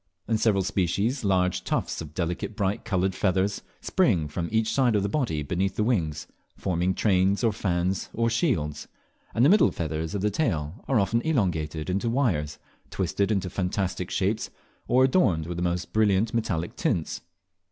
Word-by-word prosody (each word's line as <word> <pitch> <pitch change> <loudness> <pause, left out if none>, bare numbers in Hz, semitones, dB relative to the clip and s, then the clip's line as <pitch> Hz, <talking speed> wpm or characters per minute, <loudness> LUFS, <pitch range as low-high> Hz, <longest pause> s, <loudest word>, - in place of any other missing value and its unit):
In 110 -1 +1
several 105 -4 +2
species 100 - 0
large 90 -2 +1
tufts - - -2
of 75 -1 -9
delicate 90 +4 -3
bright 100 -1 -1
coloured 95 -3 0
feathers 95 +1 0 0.2
spring 100 - +2
from 85 +3 -4
each 110 0 +1
side 125 -5 +3
of 100 - +2
the 100 - 0
body 110 - -1
beneath 90 +6 -1
the 105 - +1
wings, 80 -10 0 0.3
forming 90 0 0
trains, 95 +1 +2
or 115 -2 +3
fans, 90 -1 -1
or 115 +1 0
shields; 115 - 0 0.5
and 120 - +4
the - - +6
middle 210 +3 +6
feathers 80 +2 -3
of 100 - -1
the 105 +1 +1
tail 85 - -1
are 130 -5 +3
often 115 +4 +1
elongated 80 - -1
into 100 +5 0
wires, 95 - 0 0.3
twisted 100 +1 -1
into 95 -3 0
fantastic 90 0 -2
shapes, 105 +3 -1 0.4
or 125 +2 +4
adorned 110 - +3
with 85 +1 -5
the - - -2
most 90 0 -2
brilliant 110 0 +2
metallic 95 -8 -1
tints. 80 - -1
95 Hz, 170 wpm, -26 LUFS, 85-110 Hz, 0.5 s, the